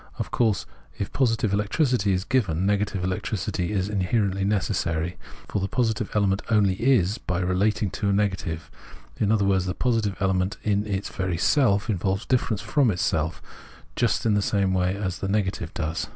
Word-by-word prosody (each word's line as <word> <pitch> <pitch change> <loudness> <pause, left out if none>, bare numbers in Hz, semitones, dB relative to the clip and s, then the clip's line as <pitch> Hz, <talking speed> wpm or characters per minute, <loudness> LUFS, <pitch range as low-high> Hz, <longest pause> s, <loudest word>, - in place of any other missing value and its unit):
Of - - -4
course, 110 -5 +1 0.3
if 100 - -4
positive 115 -6 +1
electricity 105 +1 +1
is 90 0 0
given, 95 -8 0
negative 100 -2 0
electricity 95 0 -2
is 95 -2 0
inherently 100 -1 0
necessary; 90 -4 0 0.3
for - - -2
the 95 - 0
positive 110 0 0
element 100 -1 +2
only 105 -4 +3
is 110 -3 +2
by 90 - -2
being 90 0 -1
related 100 +1 +1
to 100 - -1
a - - +3
negative; 95 -5 -1 0.5
in 105 -1 +2
other 105 -3 +3
words, 95 -2 +2
the 90 - -2
positive 115 -5 0
element 95 -1 0
in 105 0 +1
its 100 -1 -2
very 95 -3 -2
self 100 - +3
involves 95 -1 -1
difference 115 -5 0
from 115 +5 +2
itself, 85 -4 -1 0.5
just - - +1
in 110 - +3
the 105 - +2
same 100 -2 +1
way 90 0 +1
as 95 -3 -3
the 95 - -2
negative 95 -5 -1
does. 80 -1 -2
100 Hz, 175 wpm, -25 LUFS, 95-105 Hz, 0.5 s, only